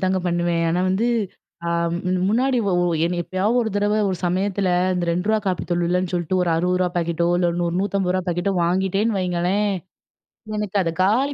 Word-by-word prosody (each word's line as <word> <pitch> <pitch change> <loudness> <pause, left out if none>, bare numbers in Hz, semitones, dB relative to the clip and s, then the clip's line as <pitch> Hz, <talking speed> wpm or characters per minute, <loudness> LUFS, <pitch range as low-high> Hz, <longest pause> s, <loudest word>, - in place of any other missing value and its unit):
அப்படிதாங்க 185 0 +2
பண்ணுவேன். 175 -1 0
ஆனா 175 +2 +1
வந்து, 200 +5 +1 0.6
ஆ - - -1 0.6
முன்னாடி 250 +4 +2
ஒ - - +1 0.5
எப்பயாவது 195 +7 0
ஒரு 220 - -2
தடவ 205 +1 +1
ஒரு 190 - -1
சமயத்தில 190 +2 0 0.3
இந்த 180 -1 -1
₹2 195 +6 +1
காப்பி 185 -2 -1
தூள் 175 0 +1
இல்லன்னு 180 +1 0
சொல்லிட்டு 175 +1 0
ஒரு 175 - 0
₹60 180 +2 +1
பாக்கெட்டோ 170 0 0
இல்ல 175 -1 +2
₹150. 185 +1 0
பாக்கெட்டோ 175 +3 0
வாங்கிட்டேன்னு 190 +5 +1
வையுங்களேன், 185 +3 0 0.9
எனக்கு 210 -1 -2
அத 165 -2 -1
காலி 250 +9 +2
185 Hz, 155 wpm, -22 LUFS, 175-205 Hz, 0.9 s, அப்படிதாங்க